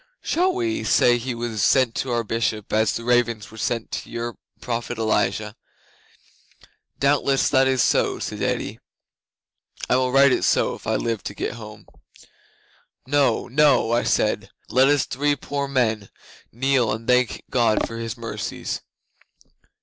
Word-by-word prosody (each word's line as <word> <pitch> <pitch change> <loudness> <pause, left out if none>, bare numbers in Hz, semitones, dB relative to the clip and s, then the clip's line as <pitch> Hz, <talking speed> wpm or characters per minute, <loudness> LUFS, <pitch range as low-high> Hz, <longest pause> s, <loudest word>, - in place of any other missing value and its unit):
"Shall 365 +2 +1
we 340 -4 -1
say 120 0 +4
he 120 +1 -4
was 115 -3 -3
sent 130 -4 +3
to 130 - -2
our 120 -1 0
Bishop 110 -1 -2
as 110 -2 +3
the 115 - -4
ravens 120 -3 +1
were 110 - -13
sent 115 0 -2
to - - -5
your 120 0 -4 0.2
prophet 120 -1 -4
Elijah?" 110 -1 0 1.4
'"Doubtless 140 -1 +2
that 130 -1 +4
is 130 -2 +2
so," - - +1
said - - -5
Eddi. - - -2 1.1
"I 125 - +3
will 130 -1 +1
write 135 +1 +6
it - - +1
so - - +2
if - - -10
I - - +1
live 115 -3 -2
to 100 - -5
get - - -3
home." 105 -2 -11 1.2
'"No 135 -3 +1
no!" 140 -3 +3
I 120 +1 +3
said. - - 0 0.2
"Let 130 +2 +4
us 145 -1 +3
three 145 +3 0
poor 140 +1 -4
men 110 -7 0 0.4
kneel 130 -1 +1
and 110 +2 -5
thank 125 -1 +2
God 115 -4 +2
for 115 - -7
His 115 -2 -5
mercies." - - -5
120 Hz, 155 wpm, -23 LUFS, 115-135 Hz, 1.4 s, write